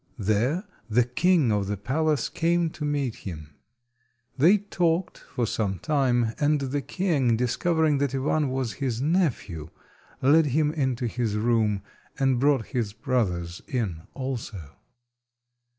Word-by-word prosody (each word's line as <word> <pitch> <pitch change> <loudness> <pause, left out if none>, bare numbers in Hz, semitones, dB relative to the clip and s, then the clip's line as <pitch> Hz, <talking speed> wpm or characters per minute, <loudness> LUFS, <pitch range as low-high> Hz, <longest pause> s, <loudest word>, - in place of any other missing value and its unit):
There 115 - +1 0.3
the 120 +3 +4
king 145 +2 +2
of 100 -2 0
the 105 0 -2
palace 145 +6 0
came 170 0 +1
to 150 - -7
meet 145 -5 -1
him. 75 -5 -8 0.8
They 170 +10 +5
talked 180 -3 -1
for 120 - -3
some 100 -3 -1
time, 120 - +1
and 150 0 +3
the 140 +1 -2
king, 140 -9 +1
discovering 150 +5 +1
that 140 -1 0
Ivan 145 +2 +1
was 130 -3 -2
his 125 -4 -1
nephew, 130 - 0 0.5
led 150 +4 +5
him 150 +2 +2
into 130 -5 -1
his 115 -2 -1
room, 105 -2 +1 0.3
and 135 -2 +2
brought 140 -4 +3
his 115 -5 -1
brothers 90 -7 -1
in 105 - -2
also. 115 - -5
130 Hz, 135 wpm, -26 LUFS, 110-150 Hz, 0.8 s, They